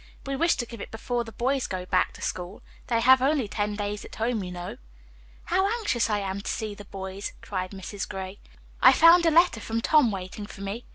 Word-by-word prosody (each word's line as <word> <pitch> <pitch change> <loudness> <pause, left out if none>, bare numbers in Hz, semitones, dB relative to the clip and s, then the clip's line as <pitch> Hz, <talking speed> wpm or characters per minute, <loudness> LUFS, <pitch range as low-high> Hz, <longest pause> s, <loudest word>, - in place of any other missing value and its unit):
"We 275 0 -2
wish 335 +5 +3
to 240 - -2
give 230 -2 -9
it - - -7
before 240 +2 -2
the 225 - -10
boys 260 +4 0
go 185 -1 -4
back 185 0 +2
to - - -10
school. 180 +2 -4 0.2
They 230 -1 +1
have 260 +2 +6
only 275 -3 +2
ten 205 0 -2
days 205 0 -3
at - - -11
home, 225 -2 -1
you 180 - -6
know." 175 0 -6 0.7
"How 380 +2 +2
anxious 240 - 0
I 210 - +1
am 195 -1 -3
to - - -5
see 215 -2 -3
the 205 0 -11
boys," 195 0 -6
cried 185 -2 -3
Mrs. 195 +1 -6
Gray. 190 0 -6 0.4
"I - - +9
found 335 +1 +7
a - - +7
letter 335 -6 +4
from 225 +1 -2
Tom 290 +1 +4
waiting 195 +1 -6
for 200 - -11
me. 200 +5 -5
215 Hz, 225 wpm, -26 LUFS, 195-255 Hz, 0.7 s, I